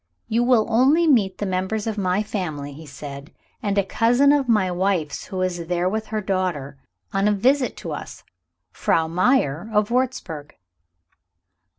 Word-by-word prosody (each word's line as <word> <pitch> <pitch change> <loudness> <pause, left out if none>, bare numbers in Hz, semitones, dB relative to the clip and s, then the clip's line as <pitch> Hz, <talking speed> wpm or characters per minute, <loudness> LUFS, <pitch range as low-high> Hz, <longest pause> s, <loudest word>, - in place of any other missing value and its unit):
"You 230 +2 +1
will 240 -3 +4
only 265 +9 +4
meet 210 - +3
the 205 - -3
members 190 +3 -2
of 220 -2 -2
my 195 0 0
family," 155 -9 -4
he 155 +2 -11
said, 140 +1 -9 0.3
"and 205 -3 -1
a 200 - +4
cousin 245 +7 +3
of 280 -3 +2
my 200 -5 +3
wife's 180 -4 -1
who 185 -1 -4
is 185 -1 -1
here 175 +1 -1
with 220 +3 -2
her 215 0 -2
daughter, 180 -8 -2 0.4
on 195 +1 +2
a - - +4
visit 250 +6 +2
to - - -6
us - - -7 0.5
Frau 160 -1 +1
Meyer, 180 - +1
of 210 +1 +1
Wurzburg." 235 - -2
195 Hz, 165 wpm, -23 LUFS, 175-230 Hz, 0.5 s, will